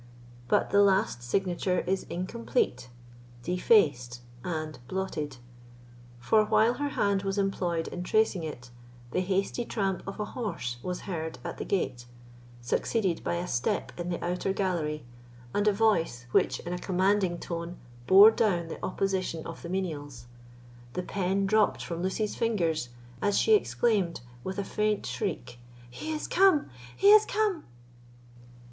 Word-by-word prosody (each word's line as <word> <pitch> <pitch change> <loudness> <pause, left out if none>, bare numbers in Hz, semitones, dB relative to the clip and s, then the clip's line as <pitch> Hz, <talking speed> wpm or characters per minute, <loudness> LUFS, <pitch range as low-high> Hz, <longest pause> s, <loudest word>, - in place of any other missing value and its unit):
But - - +2
the 200 - +5
last 195 - +3
signature 180 +7 0
is 190 +1 -1
incomplete, 180 - -2 0.5
defaced, 150 - +2 0.2
and 155 -3 -4
blotted; 155 -8 -3 0.8
for, 215 - +3
while 220 +2 +3
her 290 - 0
hand 200 -1 +2
was 195 0 -2
employed 180 -4 0
in 180 - -5
tracing 215 0 +2
it, 125 -6 -7 0.4
the - - 0
hasty 195 +5 0
tramp 195 -5 -1
of 195 - -6
a 210 - -1
horse 170 - -4
was 180 +4 -4
heard 160 -4 -4
at - - -6
the - - -3
gate, 130 -11 -2 0.5
succeeded 180 - 0
by - - -1
a 175 +1 -3
step 120 -4 -1
in 175 0 -4
the 175 - -2
outer 180 +2 -1
gallery, 160 -7 -1 0.5
and 205 +1 +1
a - - +6
voice 195 - +1
which, - - +2
in 175 - -5
a 180 - -3
commanding 190 -1 +1
tone, 170 +1 -5 0.3
bore 200 +3 +9
down 185 -8 +1
the - - -8
opposition 185 -3 -1
of 165 - -8
the 170 - -7
menials. 155 -9 -4 0.7
The 180 - -2
pen 195 +1 0
dropped 215 +1 +2
from 170 0 -4
Lucy's 195 +3 -1
fingers, 170 - 0 0.3
as 205 -1 +2
she 445 - +4
exclaimed 215 - +2 0.2
with 190 0 -4
a 200 - -1
faint 210 +1 -1
shriek: 125 -1 -4 0.3
"He 310 - -5
is 305 -1 -3
come—he 285 - +2
is 425 0 +8
come!" 420 -6 0
185 Hz, 145 wpm, -28 LUFS, 165-205 Hz, 0.8 s, bore